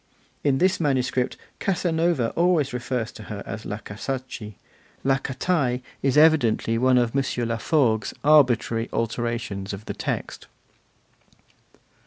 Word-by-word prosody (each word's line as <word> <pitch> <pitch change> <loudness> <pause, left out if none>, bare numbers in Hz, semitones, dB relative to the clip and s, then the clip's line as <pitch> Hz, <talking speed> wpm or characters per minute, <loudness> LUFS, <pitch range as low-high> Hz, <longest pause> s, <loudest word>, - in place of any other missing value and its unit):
In 140 -2 +3
this 185 +5 +2
manuscript 130 -4 0 0.2
Casanova 165 - +1
always 165 -6 +2
refers 125 -2 -2
to 110 - -11
her 100 -1 -5
as 110 +2 -6
La 105 - -3
Casacci; 110 0 -6 0.5
La 135 0 +2
Catai 135 -2 -1 0.2
is 135 0 +1
evidently 145 -8 +4
one 130 +1 +4
of 120 0 +1
M. 140 - +3 0.2
Laforgue's 115 -2 +1
arbitrary 125 -6 +4
alterations 115 -4 -2
of 100 +2 -8
the - - -4
text. - - -4
125 Hz, 120 wpm, -24 LUFS, 115-145 Hz, 0.5 s, evidently